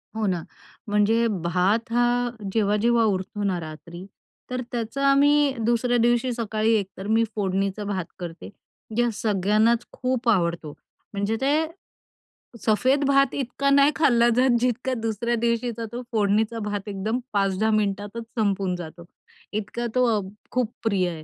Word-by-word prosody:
हो 220 Hz, -1 st, -1 dB
ना, 175 Hz, -3 st, -1 dB, 0.5 s
म्हणजे 220 Hz, +3 st, +3 dB, 0.2 s
भात 190 Hz, +7 st, +1 dB
हा 240 Hz, 0 st, +2 dB, 0.2 s
जेव्हा-जेव्हा 225 Hz, +2 st, +2 dB
उरतो 205 Hz, 0 st, -1 dB
ना 185 Hz, -3 st, 0 dB
रात्री 170 Hz, +3 st, -9 dB, 0.4 s
तर 250 Hz, 0 st, -2 dB
त्याचा 240 Hz, +4 st, -2 dB
आम्ही 290 Hz, 0 st, +4 dB
दुसऱ्या 240 Hz, +1 st, +2 dB
दिवशी 240 Hz, +2 st, +2 dB
सकाळी 225 Hz, -1 st, 0 dB
एकतर 195 Hz, -1 st, -4 dB
मी 225 Hz, +1 st, +3 dB
फोडणीचा 195 Hz, 0 st, -1 dB
भात 190 Hz, -4 st, -3 dB
करते. 170 Hz, -1 st, -7 dB, 0.5 s
या 240 Hz, 0 st, +3 dB
सगळ्यांनाच 215 Hz, +3 st, +2 dB
खूप 255 Hz, -2 st, -1 dB
आवडतो. 170 Hz, -6 st, 0 dB, 0.4 s
म्हणजे 200 Hz, +2 st, -1 dB
ते 280 Hz, +2 st, +2 dB, 1.1 s
सफेद 260 Hz, +6 st, +3 dB
भात 275 Hz, -1 st, +3 dB
इतका 275 Hz, +1 st, -1 dB
नाही 280 Hz, +1 st, +5 dB
खाल्ला 240 Hz, -6 st, +4 dB
जात 250 Hz, -2 st, +4 dB
जितका 250 Hz, +1 st, 0 dB
दुसऱ्या 230 Hz, +2 st, -1 dB
दिवशीचा 235 Hz, -1 st, -1 dB
तो 245 Hz, -, -4 dB
फोडणीचा 220 Hz, +1 st, +1 dB
भात 205 Hz, -1 st, -4 dB
एकदम 215 Hz, +5 st, -2 dB
5-10 200 Hz, +2 st, +1 dB
मिनिटातच 205 Hz, +2 st, -1 dB, 0.2 s
संपून 195 Hz, -3 st, 0 dB
जातो. 170 Hz, 0 st, -9 dB, 0.5 s
इतका 220 Hz, +3 st, -3 dB
तो 250 Hz, 0 st, +4 dB
अ, -, -, -3 dB, 0.3 s
खूप 245 Hz, -3 st, 0 dB
प्रिय 195 Hz, -5 st, +1 dB
आहे. 160 Hz, -2 st, -7 dB
220 Hz, 140 wpm, -24 LUFS, 195-240 Hz, 1.1 s, नाही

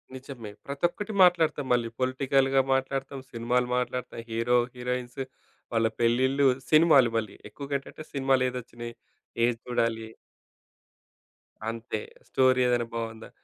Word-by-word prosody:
నిజమే. 130 Hz, -5 st, -8 dB, 0.2 s
ప్రతొక్కటి 175 Hz, +9 st, -2 dB
మాట్లాడతాం 160 Hz, -5 st, +3 dB
మళ్ళీ. 120 Hz, -1 st, +1 dB
పొలిటికల్‌గా 135 Hz, +1 st, +2 dB
మాట్లాడతాం. 135 Hz, +1 st, -2 dB
సినిమాలు 120 Hz, +1 st, 0 dB
మాట్లాడతాం. 125 Hz, -1 st, -3 dB
హీరో, 115 Hz, +2 st, +2 dB, 0.2 s
హీరోయిన్స్ 125 Hz, +1 st, -4 dB, 0.5 s
వాళ్ళ 115 Hz, 0 st, +3 dB
పెళ్ళిళ్ళు 130 Hz, +4 st, +3 dB, 0.2 s
సినిమాలు 155 Hz, -6 st, +6 dB
మళ్ళీ. 110 Hz, -3 st, -3 dB
ఎక్కువ‌గా 140 Hz, +4 st, -5 dB
ఏంటంటే 155 Hz, +3 st, -11 dB
సినిమాలు 135 Hz, -2 st, +2 dB
ఏదొచ్చినాయి. 120 Hz, -1 st, -7 dB, 0.5 s
ఏది 120 Hz, 0 st, +3 dB
చూడాలి. 115 Hz, -2 st, -1 dB, 1.6 s
అంతే. 115 Hz, -1 st, -4 dB, 0.3 s
స్టోరీ 130 Hz, -1 st, +4 dB
ఏదైనా 120 Hz, -1 st, +1 dB
బావుందా? 115 Hz, -1 st, -5 dB
125 Hz, 105 wpm, -27 LUFS, 115-135 Hz, 1.6 s, సినిమాలు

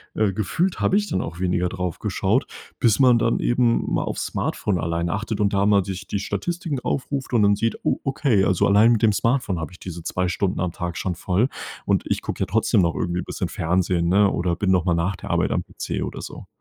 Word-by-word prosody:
äh, 105 Hz, -3 st, +1 dB
gefühlt 165 Hz, -, -1 dB
habe 195 Hz, -, +3 dB
ich 210 Hz, 0 st, 0 dB
dann -, -, 0 dB
auch 85 Hz, +1 st, -6 dB
weniger 90 Hz, -1 st, 0 dB
drauf 90 Hz, -3 st, -4 dB
geschaut, -, -, 0 dB, 0.3 s
bis 115 Hz, -1 st, +3 dB
man 125 Hz, -3 st, +6 dB
dann 115 Hz, -, +1 dB
eben 120 Hz, -1 st, +2 dB
mal -, -, +1 dB
auf's -, -, -3 dB
Smartphone 100 Hz, -4 st, -1 dB
alleine 85 Hz, +1 st, -1 dB
achtet 110 Hz, 0 st, -3 dB
und 100 Hz, -1 st, +1 dB
da 100 Hz, 0 st, +2 dB
mal 100 Hz, -2 st, +4 dB
sich 95 Hz, +1 st, -6 dB
die 100 Hz, -, -2 dB
Statistiken 155 Hz, -, -3 dB
aufruft 135 Hz, -1 st, -3 dB
und 110 Hz, -3 st, +4 dB
dann 100 Hz, 0 st, +4 dB
sieht: 115 Hz, +2 st, -1 dB
„Oh -, -, +1 dB
okay, 130 Hz, -7 st, +2 dB
also, 95 Hz, -3 st, +2 dB
allein 105 Hz, +4 st, +5 dB
mit 110 Hz, -, 0 dB
dem 105 Hz, -2 st, +5 dB
Smartphone 115 Hz, -7 st, 0 dB
habe 80 Hz, -, -5 dB
ich 90 Hz, -, -15 dB
diese 85 Hz, -2 st, -7 dB
2 90 Hz, +1 st, -1 dB
Stunden 90 Hz, 0 st, -1 dB
am 90 Hz, -1 st, -1 dB
Tag 85 Hz, -3 st, -4 dB
schon 90 Hz, 0 st, -2 dB
voll.“ 95 Hz, +8 st, +1 dB, 0.4 s
Und -, -, +1 dB
ich -, -, -1 dB
gucke -, -, -5 dB
ja -, -, +2 dB
trotzdem 110 Hz, 0 st, +2 dB
noch 85 Hz, -4 st, +1 dB
irgendwie 90 Hz, 0 st, -1 dB
bisschen -, -, -4 dB
Fernsehen, 85 Hz, 0 st, 0 dB
ne, 100 Hz, +1 st, +4 dB
oder 85 Hz, 0 st, 0 dB
bin 95 Hz, -1 st, +1 dB
noch 90 Hz, -1 st, +2 dB
mal 85 Hz, -, +2 dB
nach 85 Hz, +3 st, 0 dB
der -, -, -9 dB
Arbeit -, -, +1 dB
am -, -, 0 dB
PC -, -, -4 dB
oder -, -, -6 dB
so. -, -, -9 dB
100 Hz, 235 wpm, -23 LUFS, 90-115 Hz, 0.4 s, man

